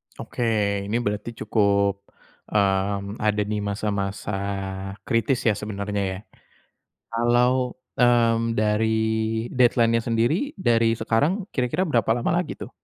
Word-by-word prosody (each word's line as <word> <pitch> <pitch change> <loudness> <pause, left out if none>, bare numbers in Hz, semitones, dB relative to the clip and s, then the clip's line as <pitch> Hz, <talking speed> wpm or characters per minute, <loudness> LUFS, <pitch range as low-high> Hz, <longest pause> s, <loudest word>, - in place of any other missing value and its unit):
Oke. 120 - -5 0.4
Ini 105 - -2
berarti 105 +1 -2
cukup, 100 -2 +1 0.4
mmm, 100 0 0
ada 105 -1 +1
di 105 +1 -3
masa-masa 100 0 -3 0.7
kritis 115 +2 +1
ya 110 - +5
sebenarnya 100 -1 -3
ya? - - -6 1.0
Kalau, 125 +2 +2 0.2
mmm, 115 -2 +3
dari 105 +1 +2 0.7
deadline-nya 115 -2 +3
sendiri 125 - 0
dari 115 -7 +2
sekarang, 145 - +1
kira-kira 130 +9 0
berapa 120 - +1
lama 120 - -1
lagi - - -7
tuh? - - -8
115 Hz, 110 wpm, -24 LUFS, 105-120 Hz, 1.0 s, ya